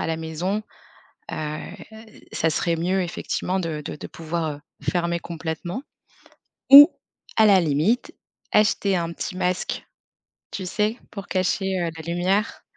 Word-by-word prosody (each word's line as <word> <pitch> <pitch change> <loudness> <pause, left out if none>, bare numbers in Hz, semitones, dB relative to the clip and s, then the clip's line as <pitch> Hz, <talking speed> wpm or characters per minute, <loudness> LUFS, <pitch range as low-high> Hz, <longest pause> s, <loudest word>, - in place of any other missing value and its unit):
à - - -1
la 160 - -1
maison, 165 +6 -3 0.7
heu, 155 0 -3 0.7
ça 165 - +1
serait 170 +1 0
mieux 185 +3 0
effectivement 180 +2 -2
de 155 -3 -3
de - - -5
de - - -8
pouvoir, 165 0 -3
heu, - - -16 0.2
fermer 170 -1 0
complètement 170 - -5 0.9
ou 290 +4 +12 0.5
à 220 -1 +6
la 195 -3 +6
limite, 165 +10 +1 0.4
acheter 200 -2 +3
un 170 -1 -2
petit 180 +2 -5
masque, 180 0 -2 0.7
tu 190 - -5
sais, 210 +5 0
pour 200 -2 -8
cacher, 190 0 0
heu, 170 - 0
la 160 - -8
lumière. 190 +5 0
180 Hz, 140 wpm, -23 LUFS, 165-195 Hz, 0.9 s, ou